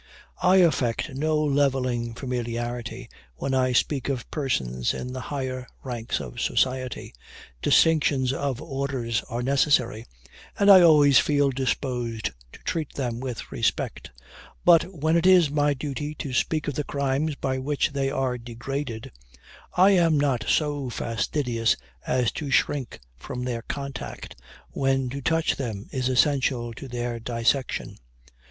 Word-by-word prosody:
I 185 +1 +5
affect 145 -7 +2
no 155 +3 +1
levelling 135 -5 0
familiarity, 120 -1 -4 0.3
when 135 - -3
I 130 -1 +2
speak 135 +1 +1
of 130 -3 -4
persons 65 - -1
in 125 0 -5
the 130 - -5
higher 130 -3 -4 0.2
ranks 120 -3 -3
of 65 -5 -6
society 130 -1 -1 0.5
distinctions 145 -5 +3
of 135 -2 -2
orders 135 -7 -2
are 120 +1 -3
necessary, 125 -4 +2 0.5
and 200 0 +6
I 190 -2 +10
always 150 -5 +7
feel 145 -2 +2
disposed 125 -3 -2 0.2
to - - -13
treat 160 -4 -3
them 120 -4 -2
with 125 -3 -6
respect - - -2 0.6
but 170 -1 +7
when 160 -2 0
it 170 +2 +3
is 180 -6 +6
my 145 -1 +2
duty 145 +2 -4
to 140 -3 -5
speak 155 +5 0
of 145 - -1
the 150 - -2
crimes 140 +2 -1
by 130 -1 -2
which 145 +3 0
they 135 -1 0
are 130 -2 -1
degraded, 120 0 -5 0.6
I 185 +3 +6
am 165 -5 +4
not 135 -5 +1
so 145 -4 0
fastidious 115 +1 0 0.3
as 125 -2 +1
to 150 -3 -5
shrink 135 -2 0 0.2
from 125 - -6
their 120 -2 -3
contact, 140 +2 -6 0.4
when 135 -1 0
to 140 +1 -5
touch 165 +3 +1
them 110 -7 -4
is 130 -1 -1
essential 130 -3 +1
to 135 - -9
their 120 -1 -3
dissection. 120 +3 -1
135 Hz, 140 wpm, -25 LUFS, 120-145 Hz, 0.6 s, I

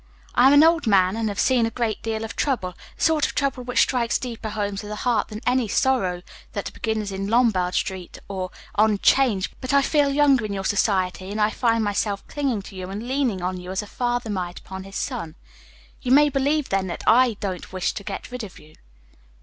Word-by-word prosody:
I'm 260 +3 +6
an 290 +1 +7
old 330 -4 +3
man, 190 -2 +4
and 225 -1 -1
have 200 - -5
seen 245 -3 +3
a - - -2
great 225 -2 -2
deal 225 -1 -3
of 225 - -6
trouble 210 -11 -1 0.2
the - - -4
sort 315 -2 +3
of - - -8
trouble 275 -3 -1
which 245 0 +2
strikes 240 -3 0
deeper 235 -3 -5
home 205 -1 -2
to 205 - -6
the 210 - -5
heart 235 -4 +2
than 215 +1 -8
any 250 -2 +2
sorrows 195 -7 +1 0.3
that - - -4
begin 220 -1 -2
in 195 0 -4
Lombard 210 -6 +2
street 185 -2 -3
or 185 -2 -4 0.2
on 215 0 +3
'Change; 215 -4 +3
but 255 +2 0
I 280 - +5
feel 290 0 +2
younger 275 -3 +4
in 210 -1 -3
your 195 -1 -4
society, 190 -2 0
and 210 +2 -4
I 210 0 +3
find 230 -2 +1
myself 205 -1 -1
clinging 265 -8 -2
to 195 - -11
you 185 0 -6
and 210 +5 -6
leaning 255 -8 0
on 185 0 -2
you 180 0 -9
as 190 +2 -2
a - - -8
father 240 +1 -2
might 180 -3 -3
upon 190 0 -8
his 195 0 -11
son. 215 - -4 0.7
You 250 - -2
may 295 +2 +6
believe, 285 +1 0
then, 195 -1 0
that 170 - -5
I 235 -1 +4
don't 185 -3 -5
wish 185 -1 -1
to 200 - -7
get 200 +5 -6
rid 250 -1 -5
of 195 - -9
you." 155 +1 -17
220 Hz, 220 wpm, -23 LUFS, 195-255 Hz, 0.7 s, an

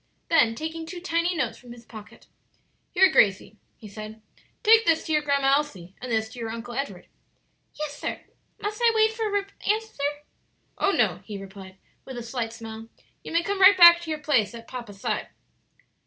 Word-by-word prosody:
Then 235 -9 +4
taking 320 +3 -5
two 355 +1 -7
tiny 340 0 0
notes 265 -8 -2
from 245 -2 -12
his 235 -1 -15
pocket: 215 -3 -13 0.6
"Here, 380 +1 +4
Gracie," 205 +1 +2 0.2
he 220 - -12
said, 215 +1 -9 0.4
"take 450 0 +6
this 330 -6 +2
to 320 - -4
your 300 - +3
Grandma 280 -2 +2
Elsie 195 -12 -4
and 250 -1 -6
this 220 -1 0
to 240 - -11
your 225 -1 -4
Uncle 230 +2 -7
Edward." 275 +3 -5 0.7
"Yes, 300 -1 -6
sir; - - -4 0.4
must 420 +3 -4
I 470 -1 +5
wait 440 0 +3
for 435 -3 -1
an 400 - -2 0.2
answer?" 440 -6 -1 0.8
"Oh, - - +2
no," - - +2
he 210 -2 -7
replied, 195 -1 -11 0.3
with 260 -2 -9
a 240 - -5
slight 230 -1 -4
smile; 225 -1 -9 0.3
"you - - -8
may 335 +1 +2
come 400 +2 -2
right 380 +1 +8
back 345 -1 +9
to 335 - -8
your 310 - -1
place 255 -8 +1
by 230 - -8
papa's 230 -4 -9
side." - - -2
275 Hz, 190 wpm, -25 LUFS, 225-345 Hz, 0.8 s, back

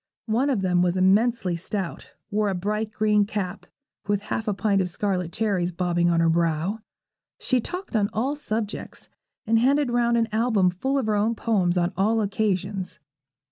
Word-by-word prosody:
One 245 +6 +1
of 245 -8 +1
them 180 -2 +2
was 180 +1 +1
immensely 195 0 +3
stout, 185 +1 -5 0.2
wore 210 0 +1
a 190 - -1
bright 210 +4 -2
green 210 -1 +2
cap, 200 -2 -4 0.4
with 205 -1 +1
half 220 +1 -3
a 210 - +1
pint 200 -1 +1
of 180 - -1
scarlet 180 -2 -2
cherries 190 -5 0
bobbing 175 0 +1
on 170 -1 +2
her 165 - +3
brow. 165 +4 +1 0.6
She 255 -2 +1
talked 360 - -6
on 205 -2 +2
all 260 +7 -1
subjects, 220 -7 -4 0.4
and 225 +1 +3
handed 275 +2 +2
round 235 -1 +2
an 230 -1 +2
album 220 -5 +2
full 265 +10 -1
of 265 - 0
her 215 - +1
own 215 +3 +1
poems 190 -6 +1
on 175 +1 +1
all 215 +5 +2
occasions. 200 -2 -1
205 Hz, 180 wpm, -25 LUFS, 180-225 Hz, 0.6 s, immensely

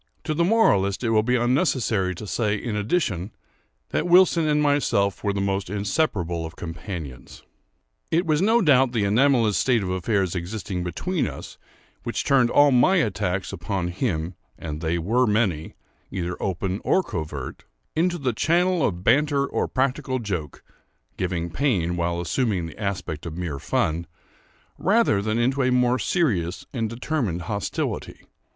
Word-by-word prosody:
To 155 - -1
the 170 +3 +1
moralist 115 - +3
it 115 - +1
will 110 -1 +4
be 125 +3 +1
unnecessary 120 - +1
to 105 - -8
say, 105 0 0
in 110 +1 -4
addition, 105 - -1 0.6
that - - -1
Wilson 175 -2 +5
and 150 0 +2
myself 145 -9 +1
were 100 - +1
the 100 0 -2
most 95 -1 -1
inseparable 100 - -1
of 80 +1 -7
companions. 80 - -8 0.7
It 170 +3 +1
was 155 0 +1
no 225 +4 +4
doubt 135 -5 +4
the 110 -4 +1
anomalous 115 0 +3
state 120 -5 +2
of 90 - -3
affairs 95 0 0
existing 90 0 -4
between 155 - -2
us, - - -9 0.4
which - - -3
turned 130 -3 +3
all 145 +2 +5
my 130 +10 +4
attacks 100 - -1
upon 90 0 -3
him, 90 -4 -2 0.2
(and 75 -2 -6
they 85 +1 0
were 115 +9 +1
many, 105 -8 0 0.3
either 90 -1 -3
open 95 +1 -2
or 190 - +2
covert) 75 - -6 0.3
into 175 +2 +1
the 130 -6 -1
channel 175 +6 +2
of 90 -6 -1
banter 140 +4 +3
or - - -1
practical 130 0 -1
joke 90 - -5 0.5
(giving 85 -2 -2
pain 90 - 0
while 85 0 -1
assuming 95 - 0
the 80 - -10
aspect 90 -6 -3
of 80 0 -7
mere 85 -6 -4
fun) 80 +4 -1 0.7
rather 200 - +3
than 110 +2 -1
into 130 +4 +1
a 130 -1 +2
more 125 0 +2
serious 95 - 0
and 115 -4 -1
determined 115 - -2
hostility. 100 +3 -3
105 Hz, 155 wpm, -24 LUFS, 90-135 Hz, 0.7 s, Wilson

